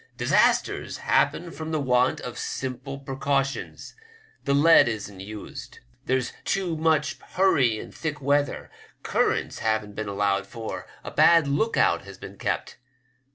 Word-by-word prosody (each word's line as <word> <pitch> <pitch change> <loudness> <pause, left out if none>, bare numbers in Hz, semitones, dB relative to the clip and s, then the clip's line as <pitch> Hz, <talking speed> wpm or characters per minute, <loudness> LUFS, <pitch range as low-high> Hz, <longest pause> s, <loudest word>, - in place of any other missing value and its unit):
Disasters - - +2
happen 175 -1 +1
from 160 -1 -6
the 155 - 0
want 125 -2 +2
of 125 - -6
simple 130 +1 -4
precautions; 135 0 -2 0.5
the 140 - +2
lead 160 -1 +6
isn't 105 -4 -5
used; 105 +2 -9 0.3
there's 130 -1 0
been - - -22
too 185 -4 -1
much 155 -2 +1
hurry 140 - +3
in - - -8
thick 155 -2 -4
weather; 145 +1 0 0.3
currents - - 0
haven't 110 -2 -1
been 110 +1 -4
allowed 100 -1 0
for; 115 +2 -6 0.2
a - - -7
bad 165 -3 +5
look 185 +12 0
out 85 - +3
has 95 -1 -11
been - - -11
kept. - - -3
135 Hz, 145 wpm, -25 LUFS, 110-150 Hz, 0.5 s, lead